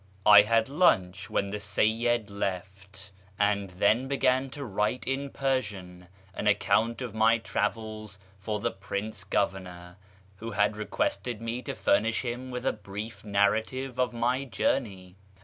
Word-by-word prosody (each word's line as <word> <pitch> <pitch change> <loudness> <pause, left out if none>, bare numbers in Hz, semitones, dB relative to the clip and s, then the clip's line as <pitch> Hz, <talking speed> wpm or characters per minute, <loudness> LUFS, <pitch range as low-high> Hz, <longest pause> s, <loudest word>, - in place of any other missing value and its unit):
I 105 -1 +10
had 115 +1 +2
lunch 105 - +2
when 100 -2 -1
the 105 - -3
Seyyid 110 +2 +1
left, 95 0 -5 0.3
and 100 -1 +1
then 105 +7 +2
began 135 -1 +1
to 140 +1 -7
write 105 +3 -1
in 135 +1 -2
Persian 100 -11 -3 0.3
an - - -3
account 115 +3 +2
of 120 -4 -6
my 110 +1 +4
travels 110 -2 -3 0.2
for 105 +2 -3
the - - -1
Prince 100 +1 -5
Governor, 90 -2 -3 0.4
who 115 +3 -6
had 105 -1 +1
requested 105 +2 -2
me 115 +2 -4
to - - -5
furnish 110 +5 +1
him 125 +2 -4
with 125 0 -5
a - - +2
brief 105 +2 -8
narrative 110 +6 0
of 125 - +2
my 125 +3 0
journey. 100 -8 -2
105 Hz, 145 wpm, -28 LUFS, 100-120 Hz, 0.4 s, I